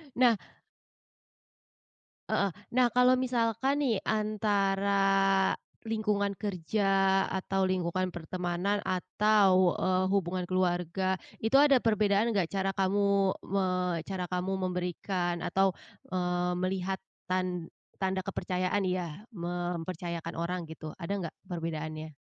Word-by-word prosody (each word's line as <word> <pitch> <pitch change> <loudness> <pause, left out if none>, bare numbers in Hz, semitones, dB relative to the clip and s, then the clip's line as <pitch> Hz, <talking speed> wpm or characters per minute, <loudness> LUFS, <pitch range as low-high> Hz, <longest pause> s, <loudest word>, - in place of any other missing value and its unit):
Nah. 245 -2 +5 1.9
Heeh. 200 - +2 0.2
Nah, 250 0 +4
kalau 250 0 +5
misalkan 255 +3 +1
nih 245 -5 +2
antara 205 -2 +1 0.9
lingkungan 210 -3 0
kerja 200 0 -1 0.4
atau 190 0 0
lingkungan 185 0 0
pertemanan 180 +4 -1
atau, 185 0 +3
eee, 185 0 +1
hubungan 185 -2 0
keluarga 185 +1 0 0.2
itu 225 +5 +5
ada 280 -3 +5
perbedaan 215 0 +3
nggak 195 -6 +1
cara 195 +1 -1
kamu 195 0 +2
me 195 0 0 0.4
cara 190 -2 -3
kamu 180 +1 -1
memberikan 180 -1 -2
atau, 195 -1 +2 0.3
eee, 180 -1 0
melihat 185 +1 -1 0.3
tan 180 -2 -1 0.3
tanda 190 -1 0
kepercayaan 185 +1 -1
ya, 180 0 -3
mempercayakan 175 -1 -4
orang 175 +1 -2
gitu, 155 -1 -8
ada 170 +3 -5 0.2
nggak - - -12 0.2
perbedaannya? 155 -2 -4
185 Hz, 105 wpm, -30 LUFS, 180-205 Hz, 1.9 s, Nah